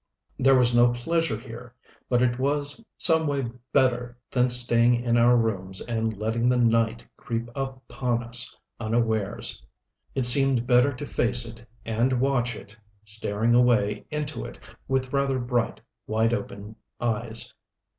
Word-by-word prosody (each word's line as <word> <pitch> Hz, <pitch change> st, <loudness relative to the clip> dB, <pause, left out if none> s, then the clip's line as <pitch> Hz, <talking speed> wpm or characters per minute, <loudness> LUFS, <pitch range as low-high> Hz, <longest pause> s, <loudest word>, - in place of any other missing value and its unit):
There 135 Hz, +1 st, +5 dB
was 125 Hz, -1 st, +3 dB
no 120 Hz, 0 st, +6 dB
pleasure 165 Hz, 0 st, -1 dB
here 120 Hz, +1 st, -11 dB, 0.3 s
but 125 Hz, 0 st, +2 dB
it 120 Hz, 0 st, 0 dB
was 145 Hz, -, 0 dB
some 160 Hz, -2 st, +5 dB
way 135 Hz, -5 st, -2 dB, 0.2 s
better 125 Hz, -2 st, +1 dB
than 125 Hz, 0 st, +2 dB
staying 120 Hz, -1 st, +3 dB
in 120 Hz, 0 st, 0 dB
our 120 Hz, +1 st, +5 dB
rooms 95 Hz, -5 st, -1 dB
and 115 Hz, -2 st, -3 dB
letting 115 Hz, +3 st, 0 dB
the 125 Hz, -, +2 dB
night 115 Hz, -1 st, +1 dB
creep 115 Hz, -2 st, -4 dB
upon 130 Hz, -3 st, -3 dB
us 120 Hz, +1 st, -3 dB, 0.2 s
unawares. 110 Hz, -, -1 dB, 0.5 s
It 130 Hz, -2 st, +1 dB
seemed 130 Hz, -1 st, +5 dB
better 125 Hz, +3 st, +4 dB
to 140 Hz, +2 st, -7 dB
face 120 Hz, -2 st, 0 dB
it 115 Hz, 0 st, -11 dB, 0.2 s
and 115 Hz, +3 st, 0 dB
watch 120 Hz, -3 st, 0 dB
it, 105 Hz, +1 st, -12 dB, 0.3 s
staring 110 Hz, +2 st, -1 dB
away 120 Hz, -4 st, +2 dB
into 150 Hz, 0 st, -4 dB
it -, -, -9 dB, 0.3 s
with 130 Hz, 0 st, -1 dB
rather 140 Hz, -1 st, +1 dB
bright, 120 Hz, -2 st, -1 dB, 0.3 s
wide 110 Hz, +2 st, +1 dB
open 105 Hz, -2 st, -6 dB, 0.2 s
eyes.... 115 Hz, -1 st, -2 dB
120 Hz, 145 wpm, -25 LUFS, 115-130 Hz, 0.5 s, no